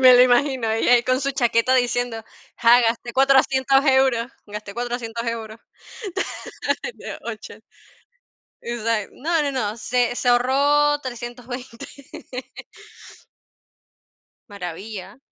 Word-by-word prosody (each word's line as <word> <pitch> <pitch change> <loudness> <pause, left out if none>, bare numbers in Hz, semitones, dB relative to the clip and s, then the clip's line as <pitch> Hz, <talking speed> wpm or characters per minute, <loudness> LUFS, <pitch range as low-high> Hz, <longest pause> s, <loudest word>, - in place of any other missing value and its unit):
Me 255 -1 +9
lo 245 - +8
imagino, 255 -1 +2
ahí 220 +1 0
ahí 245 -1 +6
con 255 +2 +1
su 275 0 0
chaqueta 245 -1 +2
diciendo: 245 -2 0 0.3
"Ja, 240 +1 +6
gasté 235 +1 -1
400€ 270 0 +4
euros, 265 -4 +3 0.2
gasté 210 -1 -7
400€ 240 -1 -4
euros". 225 -1 -4 1.7
Oh, - - -3
che. - - -11 1.0
O 235 -1 -4
sea, 220 -2 0
no, 325 +2 0
no, 285 - 0
no, 220 -4 -2
se 245 +1 0
se 245 - -1
ahorró 285 +4 +3
320. 245 -1 -7 2.6
Maravilla. 195 +3 -7
245 Hz, 110 wpm, -22 LUFS, 230-265 Hz, 2.6 s, Me